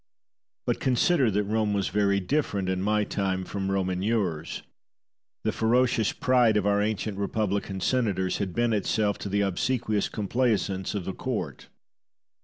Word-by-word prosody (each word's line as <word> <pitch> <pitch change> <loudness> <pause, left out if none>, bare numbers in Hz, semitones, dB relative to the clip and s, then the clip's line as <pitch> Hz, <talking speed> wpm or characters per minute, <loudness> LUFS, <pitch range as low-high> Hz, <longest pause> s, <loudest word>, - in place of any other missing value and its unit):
But - - 0
consider 130 +1 +3
that 105 0 +1
Rome 105 0 0
was 100 -2 0
very 100 -1 +2
different 100 -3 -1
in 95 0 -1
my 105 +1 +2
time 95 -2 -1
from 95 0 -3
Rome 95 -1 0
in 90 0 -2
yours. 95 -7 -1 0.8
The - - +1
ferocious 120 -1 +2
pride 125 -4 +3
of 105 - 0
our 100 0 +3
ancient 105 -1 -2
republican 100 -1 -1
senators 100 -5 0
had 95 -4 -3
bent 120 -1 +2
itself 105 0 0
to 100 - -5
the 100 +1 +1
obsequious 105 +2 0
complaisance 105 -3 -1
of 95 -4 -4
a 95 - -2
court. - - -4
105 Hz, 155 wpm, -27 LUFS, 95-110 Hz, 0.8 s, consider